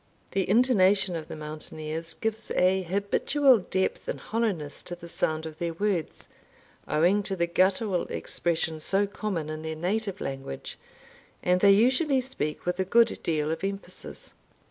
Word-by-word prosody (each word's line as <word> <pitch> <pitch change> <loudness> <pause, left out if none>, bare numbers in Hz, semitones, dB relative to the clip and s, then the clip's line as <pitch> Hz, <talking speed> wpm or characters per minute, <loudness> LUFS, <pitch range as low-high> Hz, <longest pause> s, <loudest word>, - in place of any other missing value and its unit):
The 195 -2 0
intonation 200 -5 +4
of 160 -2 -5
the - - -7
mountaineers 155 +1 -5
gives 220 0 -2
a 185 +1 +3
habitual 205 - +3
depth 190 0 -2
and - - -3
hollowness 200 -11 -2
to 175 - -5
the 170 -1 -11
sound 160 -1 -1
of 160 0 -8
their 170 -1 -2
words, 190 -4 -2 0.6
owing 175 +7 +3
to 195 -1 -3
the 170 -2 +1
guttural 185 +2 +1
expression 165 -2 -1
so 195 +6 +1
common 200 -6 -3
in 155 0 -5
their 160 0 -4
native 195 +4 -2
language, 135 - -6 0.6
and 180 0 +3
they 200 - +7
usually 260 +6 +3
speak 250 - -4
with 180 +1 -1
a - - +3
good 230 +5 +3
deal 155 -2 0
of 165 - -4
emphasis. 195 0 -5
185 Hz, 155 wpm, -27 LUFS, 160-205 Hz, 0.6 s, they